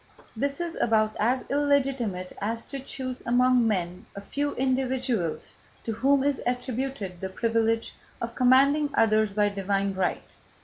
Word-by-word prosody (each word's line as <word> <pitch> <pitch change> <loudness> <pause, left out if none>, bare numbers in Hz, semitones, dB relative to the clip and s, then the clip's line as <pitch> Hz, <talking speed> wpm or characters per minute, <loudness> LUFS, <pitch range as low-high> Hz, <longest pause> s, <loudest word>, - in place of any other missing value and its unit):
This 280 +6 -2
is 345 -1 -3
about 215 -1 +2
as 250 +4 +1
illegitimate 270 -10 0
as 225 +3 -2
to 275 - -6
choose 260 -1 -5
among 250 0 +3
men 180 -4 -2
a 200 - -6
few 285 +8 -2
individuals 255 -8 -1 0.3
to 225 - -3
whom 265 +5 +2
is 285 -1 0
attributed 245 -6 -3
the 190 - -3
privilege 225 +2 0 0.3
of 235 0 -4
commanding 275 +4 +4
others 215 -2 +3
by 205 0 +2
divine 200 0 -1
right. 190 -1 -2
235 Hz, 140 wpm, -26 LUFS, 210-265 Hz, 0.3 s, commanding